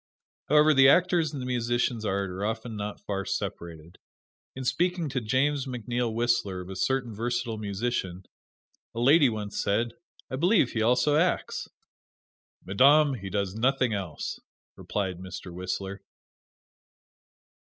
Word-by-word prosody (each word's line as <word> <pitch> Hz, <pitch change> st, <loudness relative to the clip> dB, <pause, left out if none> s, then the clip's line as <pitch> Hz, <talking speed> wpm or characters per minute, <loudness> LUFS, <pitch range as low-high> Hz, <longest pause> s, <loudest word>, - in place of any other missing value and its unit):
However, 150 Hz, +1 st, +6 dB
the 135 Hz, -1 st, +7 dB
actor's 175 Hz, -1 st, +3 dB
and 145 Hz, -, -6 dB
the 125 Hz, -, -5 dB
musician's 120 Hz, -2 st, -1 dB
art 100 Hz, -1 st, -1 dB
are 95 Hz, +2 st, -5 dB
often 110 Hz, +1 st, -3 dB
not 105 Hz, 0 st, -5 dB
far 100 Hz, -1 st, -3 dB
separated. 85 Hz, -3 st, -5 dB, 0.6 s
In 130 Hz, 0 st, -6 dB
speaking 175 Hz, +2 st, 0 dB
to 130 Hz, -1 st, -2 dB
James 135 Hz, +5 st, 0 dB
McNeil 120 Hz, -1 st, -2 dB
Whistler 115 Hz, -5 st, 0 dB
of 90 Hz, +1 st, -9 dB
a -, -, -6 dB
certain 125 Hz, +3 st, -1 dB
versatile 120 Hz, 0 st, -2 dB
musician, 100 Hz, -3 st, -3 dB, 0.7 s
a -, -, -3 dB
lady 140 Hz, +3 st, +5 dB
once 105 Hz, -2 st, -4 dB
said, 115 Hz, +3 st, 0 dB, 0.4 s
"I 130 Hz, -, -2 dB
believe 175 Hz, -, +3 dB
he 115 Hz, -, -1 dB
also 125 Hz, +6 st, +3 dB
acts!" 175 Hz, +2 st, 0 dB, 1.0 s
"Madame, 140 Hz, +9 st, +5 dB
he 100 Hz, -6 st, -6 dB
does 100 Hz, -1 st, -2 dB
nothing 125 Hz, +1 st, +1 dB
else," 95 Hz, -6 st, -4 dB, 0.4 s
replied 95 Hz, -4 st, -3 dB
Mr. 90 Hz, -1 st, -8 dB
Whistler. 95 Hz, +2 st, -4 dB
115 Hz, 135 wpm, -27 LUFS, 100-135 Hz, 1.0 s, the